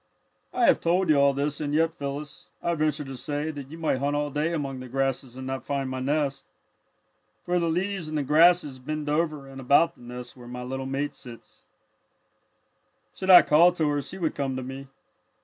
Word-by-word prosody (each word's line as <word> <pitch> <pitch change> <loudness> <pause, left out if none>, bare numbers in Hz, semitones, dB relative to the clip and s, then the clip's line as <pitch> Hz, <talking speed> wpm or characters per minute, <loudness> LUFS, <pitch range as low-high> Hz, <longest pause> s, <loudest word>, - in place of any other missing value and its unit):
"I 245 - +2
have - - +5
told 175 +1 +1
you 150 - +5
all 140 0 +5
this, 140 +2 -2
and 145 0 -1
yet, 165 +1 +2
Phyllis, 145 -1 -6 0.2
I 170 - +1
venture 155 -2 0
to 135 0 -7
say 145 +4 -3
that 140 -3 -9
you 160 - -9
might 160 -5 0
hunt 140 +2 0
all 145 0 -1
day 150 +4 0
among 140 -5 -3
the 130 - -8
grasses 130 -1 -2
and 130 - -6
not 130 0 -4
find 135 -2 -2
my 130 - -3
nest. 140 +1 -1 1.0
For 180 0 +1
the 170 -1 0
leaves 180 0 -2
and 155 - -2
the 145 - 0
grasses 155 -2 +4
bend 150 +3 -4
over 150 -2 -1
and 135 0 -9
about 145 +6 +4
the - - -21
nest 125 0 -9
where 125 -2 -13
my 125 0 -6
little 130 +1 -4
mate 140 +2 -2
sits. 120 -3 -12 1.5
"Should 190 - -5
I 180 -2 +10
call 170 +4 +5
to 160 -4 0
her 145 0 0
she 140 +8 -8
would 165 -4 -1
come 135 -2 -2
to 130 - -4
me. 135 +2 -8
145 Hz, 210 wpm, -26 LUFS, 135-160 Hz, 1.5 s, I